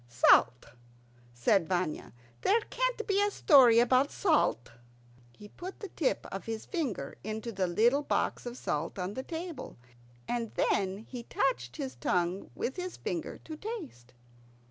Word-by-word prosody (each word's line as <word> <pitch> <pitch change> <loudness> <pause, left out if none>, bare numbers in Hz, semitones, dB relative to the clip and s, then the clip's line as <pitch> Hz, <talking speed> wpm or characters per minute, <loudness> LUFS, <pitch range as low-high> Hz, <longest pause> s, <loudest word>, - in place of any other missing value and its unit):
"Salt," 120 +1 +5 0.7
said 140 +9 +2
Vanya. 180 -4 -1 0.3
"There 440 - +4
can't - - 0
be 400 -1 +2
a 410 - +3
story 270 - +6
about 255 +4 +4
salt." 300 - +1 0.7
He 210 - -11
put 365 - -9
the 405 - -7
tip 305 - -1
of 195 - -5
his 225 -1 -4
finger 255 - -3
into 220 +3 -4
the 190 -3 -1
little 235 +11 +3
box 290 - -1
of 240 +1 -6
salt 150 -3 -3
on 185 +1 -3
the 260 - -4
table, 330 -1 -6 0.5
and 235 -2 -3
then 190 -1 +1
he 250 -2 -6
touched 180 - -1
his 130 -1 -4
tongue 175 +9 -1
with 265 - -3
his 365 0 -5
finger - - -4
to 315 - -6
taste. 310 - -8
235 Hz, 150 wpm, -30 LUFS, -, 0.7 s, story